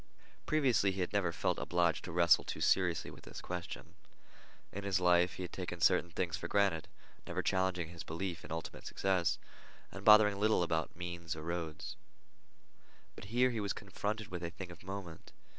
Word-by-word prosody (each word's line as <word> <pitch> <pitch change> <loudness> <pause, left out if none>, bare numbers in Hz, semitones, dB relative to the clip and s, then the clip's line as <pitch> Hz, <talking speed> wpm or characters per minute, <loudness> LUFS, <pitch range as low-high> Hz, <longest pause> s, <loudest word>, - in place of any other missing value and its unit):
Previously 125 -10 +3
he 95 0 -3
had 90 - -2
never 100 -4 +2
felt - - -1
obliged 85 -2 +1
to 90 - -6
wrestle 85 0 +5
too - - -5
seriously 90 -3 +2
with - - -13
this - - -8
question. 90 -1 -6 0.8
In 100 - -5
his 100 -2 +1
life 90 0 +4
he 95 - -5
had 90 - -7
taken 90 -2 -5
certain 85 +2 +4
things 85 0 -2
for 85 -1 -5
granted, 100 -5 +2 0.4
never - - -2
challenging 95 -3 0
his 85 -1 -9
belief 85 +1 -4
in - - -10
ultimate 80 0 -5
success, 95 -3 +1 0.5
and 100 - -8
bothering 105 -1 +7
little 110 -3 +3
about 80 -2 -1
means 85 -2 -5
and 80 0 -8
roads. 85 -2 -4 1.2
But - - -10
here 125 +4 +3
he 115 - -2
was 100 -1 -1
confronted 105 +2 -4
with 90 -1 -5
a 85 - -2
thing 90 +1 -8
of 85 - -13
moment. 95 -4 -7
90 Hz, 180 wpm, -34 LUFS, 85-100 Hz, 1.2 s, bothering